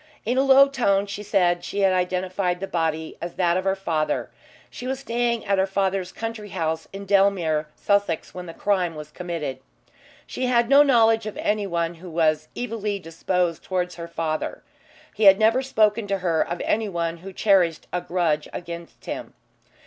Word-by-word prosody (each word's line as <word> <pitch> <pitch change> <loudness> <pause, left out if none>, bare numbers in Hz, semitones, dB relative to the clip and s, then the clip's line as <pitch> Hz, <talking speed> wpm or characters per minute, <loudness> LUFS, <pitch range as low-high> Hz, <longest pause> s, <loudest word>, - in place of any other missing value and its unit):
In 240 +3 0
a 260 - +4
low 275 0 +7
tone 205 -8 +1
she 205 +1 -6
said 180 -4 +1
she 200 +3 -3
had 190 -1 +4
identified 180 0 -1
the 195 - -3
body 160 -3 -2
as 170 0 -5
that 175 -2 +2
of 185 +1 -1
her 195 0 +2
father. 165 -5 -1 0.4
She 250 - -7
was 265 +1 -3
staying 235 -2 -1
at 200 -1 +1
her 190 - +2
father's 190 -1 -1
country 225 -2 -6
house 160 -2 -2
in 195 0 -7
Dellmere, 190 -6 +2
Sussex, 200 -5 0
when 180 -1 -7
the 165 - -7
crime 185 -5 0
was 150 0 -9
committed. 165 -7 -4 0.7
She 255 - -3
had 240 -1 +2
no 280 +1 +8
knowledge 225 -5 +4
of 215 - -6
anyone 175 -5 -1
who 180 - -9
was 155 -2 +1
evilly 220 -4 -3
disposed 175 0 -2
towards 180 -1 -2
her 170 0 -6
father. 160 -2 -3 0.5
He 215 - 0
had 195 -1 +9
never 225 +4 +3
spoken 215 -4 +2
to 195 0 0
her 170 -4 +1
of 175 +1 -2
anyone 170 -6 -1
who 190 +3 -9
cherished 185 -5 +2
a 180 - 0
grudge 165 -5 0
against 170 -1 -8
him. - - -6
190 Hz, 180 wpm, -24 LUFS, 170-210 Hz, 0.7 s, had